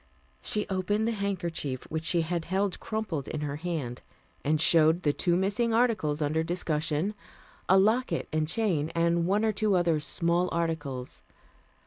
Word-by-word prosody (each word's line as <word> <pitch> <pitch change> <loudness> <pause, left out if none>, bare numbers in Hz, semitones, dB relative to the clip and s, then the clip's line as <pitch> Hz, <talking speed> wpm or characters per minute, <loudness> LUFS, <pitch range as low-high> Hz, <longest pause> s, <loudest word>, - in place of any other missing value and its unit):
She 210 - +2
opened 205 +3 0
the - - +1
handkerchief 175 - -3
which 160 0 -3
she 170 0 +2
had 165 0 -2
held 190 +1 -1
crumpled 210 - -3
in 155 - -4
her 145 -1 -3
hand, 150 -7 -4 0.4
and 155 +1 +1
showed 165 +2 +4
the 145 - +2
two 175 +2 +1
missing 220 +5 +1
articles 185 -11 +1
under 155 +2 +1
discussion, 165 +1 -1 0.6
a 190 - +7
locket 220 +6 +2
and 155 0 +1
chain 170 -5 0
and 170 0 +2
one 205 +3 +2
or 220 - +3
two 210 -1 +1
other 170 -3 +2
small 170 +4 0
articles. 145 - -3
170 Hz, 155 wpm, -28 LUFS, 155-200 Hz, 0.6 s, a